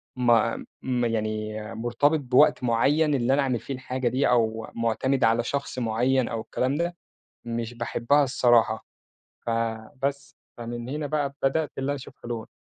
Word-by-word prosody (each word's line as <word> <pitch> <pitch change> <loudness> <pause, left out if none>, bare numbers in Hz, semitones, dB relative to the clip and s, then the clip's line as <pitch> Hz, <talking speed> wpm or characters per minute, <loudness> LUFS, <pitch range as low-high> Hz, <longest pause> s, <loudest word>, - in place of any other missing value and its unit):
ما 120 -2 +2 0.2
م 125 -2 0
يعني 110 -1 -2 0.2
مرتبِط 120 +7 +1
بوقت 130 0 +4
معيّن 145 +6 +3
اللي 125 +1 +2
أنا 140 - +3
أعمل 125 -4 0
فيه 135 - -6
الحاجة 130 -1 -3
دي 130 +3 +2
أو 115 -2 +1
مُعتمِد 115 +3 0
على 115 +1 +3
شخص 140 -1 -3
معيّن 125 +2 +1
أو 115 -1 -3
الكلام 130 +4 -1
ده، 170 +2 -1 0.5
مش 115 0 -4
باحبها 120 +4 +2
الصراحة. 120 -3 +3 0.6
فبس، 115 +5 -2 0.2
فمن 120 +1 -6
هنا 145 +1 -3
بقى 145 -2 -1
بدأت 150 +3 +1
اللي 135 +1 -2
أنا 145 - 0
أشوف 135 - -10
حلول. 120 -2 -5
125 Hz, 150 wpm, -26 LUFS, 115-140 Hz, 0.6 s, بوقت